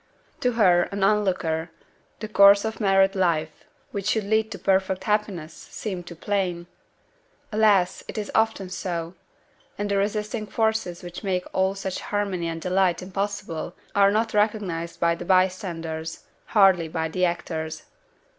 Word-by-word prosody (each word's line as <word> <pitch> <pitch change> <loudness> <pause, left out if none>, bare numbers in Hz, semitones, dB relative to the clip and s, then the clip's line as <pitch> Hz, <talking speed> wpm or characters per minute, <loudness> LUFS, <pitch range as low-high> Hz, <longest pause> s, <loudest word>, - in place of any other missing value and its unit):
To 250 -1 +1
her, 180 -6 +4
an 200 -1 -2
on 210 +1 +4
looker, 165 -4 -1 0.5
the 215 - -3
course 200 0 +6
of 220 0 -4
married 195 -1 +3
life, 160 -4 0 0.3
which 200 0 -4
should 215 0 +1
lead 220 +2 +1
to - - -6
perfect 190 -1 +1
happiness, 205 -7 -1
seemed 180 -3 -7
to 170 - -8
plain! 180 -1 -2 0.9
Alas! 210 -4 +3
it - - -7
is 210 -1 -3
often 220 -4 +1
so! 170 -2 -4 0.6
and 205 0 -2
the 200 - +2
resisting 210 +1 -2
forces 220 -6 -1
which 175 +3 -8
make 185 -2 -1
all 190 +1 +1
such 195 -1 -4
harmony 200 -4 -2
and 165 0 -5
delight 185 -1 +1
impossible 195 -3 -4 0.2
are 200 -1 +5
not 220 +2 0
recognized 205 -6 -1
by 170 0 +3
the 170 - -6
bystanders, 175 -4 -1 0.2
hardly 190 -6 +4
by 160 0 -2
the 180 +3 -2
actors. 160 -2 -2
190 Hz, 150 wpm, -25 LUFS, 175-205 Hz, 0.9 s, course